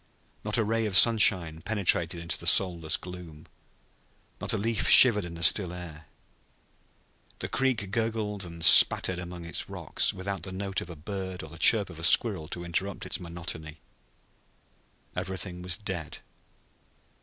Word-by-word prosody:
Not 105 Hz, +1 st, -3 dB
a 115 Hz, -, +1 dB
ray 115 Hz, +1 st, -2 dB
of 95 Hz, -3 st, +3 dB
sunlight 90 Hz, -8 st, +5 dB
penetrated 90 Hz, -5 st, 0 dB
into 85 Hz, 0 st, -5 dB
the -, -, -6 dB
soundless 85 Hz, -5 st, +1 dB
gloom. 90 Hz, -4 st, -12 dB, 0.9 s
Not -, -, -1 dB
a -, -, -1 dB
leaf 110 Hz, +1 st, -2 dB
shivered 110 Hz, -6 st, +7 dB
in 85 Hz, -1 st, -9 dB
the 85 Hz, -, -7 dB
still 90 Hz, 0 st, +2 dB
air. 85 Hz, -3 st, -11 dB, 1.3 s
The -, -, -6 dB
creek 125 Hz, -7 st, -2 dB
gurgled 110 Hz, -3 st, -3 dB
and 85 Hz, -1 st, -5 dB
spattered 90 Hz, +1 st, +5 dB
among 90 Hz, -1 st, -9 dB
its 85 Hz, -, -5 dB
rocks, -, -, -2 dB
without 95 Hz, -1 st, -7 dB
the 95 Hz, +2 st, -8 dB
note 95 Hz, 0 st, -5 dB
of -, -, -10 dB
a 85 Hz, -, -9 dB
bird 95 Hz, +2 st, -7 dB
or 80 Hz, -, -11 dB
the 85 Hz, -, -13 dB
chirp 105 Hz, -2 st, +4 dB
of 80 Hz, -, -13 dB
a -, -, -10 dB
squirrel 90 Hz, -3 st, +3 dB
to 85 Hz, +1 st, -8 dB
interrupt 95 Hz, +3 st, -4 dB
its -, -, -3 dB
monotony. 85 Hz, -3 st, -8 dB, 1.4 s
Everything 90 Hz, -1 st, -5 dB
was 90 Hz, 0 st, -3 dB
dead. 85 Hz, -7 st, -7 dB
90 Hz, 155 wpm, -26 LUFS, 85-100 Hz, 1.4 s, shivered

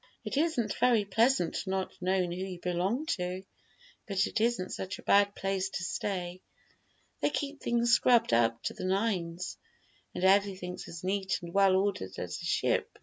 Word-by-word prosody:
"It -, -, -3 dB
isn't 290 Hz, -8 st, +1 dB
very 235 Hz, -4 st, +4 dB
pleasant 215 Hz, -2 st, +1 dB
not 190 Hz, 0 st, -2 dB
knowing 185 Hz, -1 st, +1 dB
who 175 Hz, -, -4 dB
you 185 Hz, -2 st, -6 dB
belong 180 Hz, -, -1 dB
to, 185 Hz, -, -2 dB, 0.6 s
but 195 Hz, -2 st, +1 dB
it 220 Hz, -, -2 dB
isn't 230 Hz, -5 st, 0 dB
such 185 Hz, 0 st, -4 dB
a -, -, -13 dB
bad 200 Hz, 0 st, +4 dB
place 195 Hz, 0 st, -1 dB
to 175 Hz, -, -4 dB
stay. 180 Hz, 0 st, -3 dB, 0.8 s
They -, -, +2 dB
keep 285 Hz, 0 st, -4 dB
things 235 Hz, 0 st, +2 dB
scrubbed 240 Hz, -, +4 dB
up 115 Hz, 0 st, +2 dB
to -, -, -2 dB
the -, -, -8 dB
nines, 185 Hz, -3 st, -1 dB, 0.6 s
and -, -, -3 dB
everything's 190 Hz, -2 st, +1 dB
as 170 Hz, 0 st, -9 dB
neat 190 Hz, 0 st, 0 dB
and 170 Hz, 0 st, -8 dB
well 195 Hz, -1 st, +5 dB
ordered 190 Hz, -, -1 dB
as -, -, -5 dB
a -, -, -6 dB
ship. -, -, 0 dB
190 Hz, 170 wpm, -30 LUFS, 180-215 Hz, 0.8 s, well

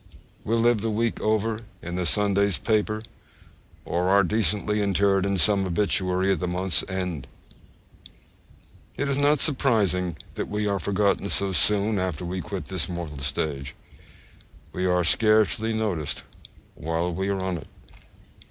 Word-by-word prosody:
We 115 Hz, -, 0 dB
live 115 Hz, -1 st, +3 dB
the 115 Hz, -, -1 dB
week 115 Hz, +2 st, -1 dB
over 110 Hz, +1 st, 0 dB, 0.2 s
in 85 Hz, -, -6 dB
the 90 Hz, -1 st, -1 dB
Sunday's 100 Hz, -2 st, +2 dB
paper, 110 Hz, -1 st, 0 dB, 0.8 s
or 90 Hz, +2 st, 0 dB
are 100 Hz, +1 st, +5 dB
decently 105 Hz, +1 st, +1 dB
interred 100 Hz, 0 st, +2 dB
in 100 Hz, 0 st, 0 dB
some 100 Hz, +2 st, +4 dB
obituary 95 Hz, 0 st, +1 dB
at 95 Hz, -, 0 dB
the 90 Hz, -, -2 dB
month's 90 Hz, +1 st, +1 dB
end! 90 Hz, -6 st, -4 dB, 1.7 s
It 145 Hz, -, -1 dB
is 140 Hz, -1 st, 0 dB
not 145 Hz, +1 st, +4 dB
surprising 105 Hz, -, +1 dB, 0.2 s
that -, -, -4 dB
we 105 Hz, 0 st, -1 dB
are 100 Hz, -1 st, 0 dB
forgotten 100 Hz, +2 st, 0 dB
so 100 Hz, -1 st, +1 dB
soon 105 Hz, +2 st, +2 dB
after 90 Hz, -2 st, -3 dB
we 90 Hz, +1 st, -4 dB
quit 100 Hz, -2 st, -6 dB
this 95 Hz, -4 st, -1 dB
mortal 85 Hz, -5 st, -6 dB
stage; 70 Hz, 0 st, -3 dB, 1.0 s
we 90 Hz, 0 st, -1 dB
are 90 Hz, 0 st, +2 dB
scarcely 110 Hz, +4 st, +4 dB
noticed 100 Hz, -10 st, -2 dB, 0.5 s
while 80 Hz, +3 st, -2 dB
we 95 Hz, +3 st, -2 dB
are 100 Hz, -1 st, -1 dB
on 95 Hz, -1 st, -2 dB
it. 70 Hz, -, -13 dB
100 Hz, 145 wpm, -25 LUFS, 90-105 Hz, 1.7 s, are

